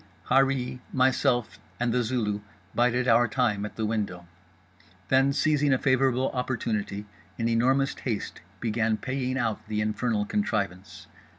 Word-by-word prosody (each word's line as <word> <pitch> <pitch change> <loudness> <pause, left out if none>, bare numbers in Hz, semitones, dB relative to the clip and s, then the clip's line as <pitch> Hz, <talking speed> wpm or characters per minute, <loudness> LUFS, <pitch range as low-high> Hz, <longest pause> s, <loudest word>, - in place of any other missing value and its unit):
Harree, 135 -1 +2
myself 125 -2 +1 0.2
and 120 -1 +1
The 125 - +2
Zulu 110 -4 -1 0.3
bided 125 +1 +2
our 120 +1 +5
time 105 -3 0
at - - -14
the 110 - -2
window—then 90 +3 -3
seizing 150 0 +2
a - - +3
favourable 130 -1 +2
opportunity, 110 -5 -2 0.3
in 115 - 0
enormous 130 +4 +2
haste 115 -6 -4 0.2
began 110 -1 0
paying 130 +2 -2
out 115 -4 -2
the 105 0 -2
infernal 105 0 0
contrivance. 95 - -2
115 Hz, 125 wpm, -27 LUFS, 105-130 Hz, 0.3 s, our